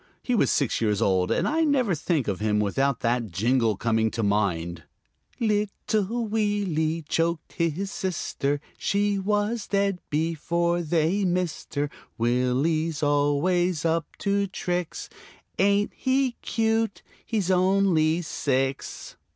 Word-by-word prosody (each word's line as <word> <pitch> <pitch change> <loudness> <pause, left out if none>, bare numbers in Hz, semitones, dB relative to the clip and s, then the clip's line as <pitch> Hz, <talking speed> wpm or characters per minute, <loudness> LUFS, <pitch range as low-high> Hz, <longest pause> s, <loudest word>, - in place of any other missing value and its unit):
He 250 - -1
was 230 - +3
six 140 -5 +1
years 105 -3 +1
old, 95 -2 +2
and - - +1
I 320 +2 +2
never 265 - +2
think 155 -3 -1
of 100 -3 -1
him 105 0 +1
without 130 +6 0
that 115 -1 0
jingle 115 +3 +1
coming 110 0 +1
to 115 0 -3
mind: 90 -5 0 0.6
"Little 215 +1 0
Willie 195 -7 0
choked 165 0 -1
his 170 +4 -1
sister, 145 -5 -2 0.2
She 205 0 +1
was 210 +3 0
dead 200 -2 +1
before 170 +2 0
they 170 +4 +1
missed 180 -4 -2
her. 145 0 -1 0.3
Willie's 135 +7 +1
always 150 +4 +2
up 165 -1 +1
to 200 0 0
tricks. 180 -2 -3 0.5
Ain't 200 +2 +3
he 260 0 +1
cute, 225 -1 0 0.2
he's 205 -5 -1
only 180 -3 +3
six!" 135 -3 -2
165 Hz, 125 wpm, -26 LUFS, 135-200 Hz, 0.6 s, was